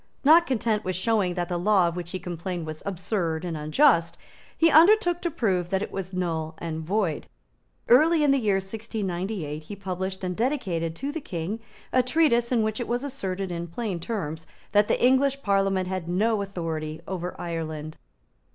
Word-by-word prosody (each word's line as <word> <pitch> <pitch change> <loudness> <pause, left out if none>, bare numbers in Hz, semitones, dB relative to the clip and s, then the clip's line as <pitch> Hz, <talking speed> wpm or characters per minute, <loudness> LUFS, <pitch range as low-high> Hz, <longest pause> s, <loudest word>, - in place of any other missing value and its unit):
Not 325 +4 +7
content 220 -4 0
with 185 0 -2
showing 190 -3 +1
that 175 -1 -1
the 175 -1 -2
law 190 -1 +4
of 170 - -3
which 175 -1 -5
he 185 - -3
complained 175 -1 -5
was 155 0 -6
absurd 180 -3 -2
and 170 -2 -3
unjust, 165 - +3 0.4
he 330 0 +5
undertook 350 +2 +5
to 345 - 0
prove 190 - 0
that 190 +1 0
it - - -6
was 190 -1 -5
null 165 -4 -2
and 160 -1 -4
void. 185 -2 -1 0.6
Early 310 +6 +5
in 290 - +4
the 275 - +3
year 210 -5 +2
1698 190 -5 -3
he 160 +6 -8
published 190 -1 -4
and 180 -1 -2
dedicated 185 - -1
to 275 +10 -3
the 320 +1 -5
King 185 +1 -4 0.3
a 255 - +5
treatise 255 -3 +2
in 235 -3 +3
which 215 +1 -1
it 240 - -3
was 240 +2 -1
asserted 195 -9 -4
in 170 0 -4
plain 190 0 -3
terms 160 -5 -4 0.2
that 205 0 +4
the - - +1
English 270 +2 +3
Parliament 195 -2 +1
had 185 -2 -4
no 210 +4 +1
authority 160 -5 -4
over 180 -1 -4
Ireland. 155 -2 -5
190 Hz, 180 wpm, -26 LUFS, 170-230 Hz, 0.6 s, Not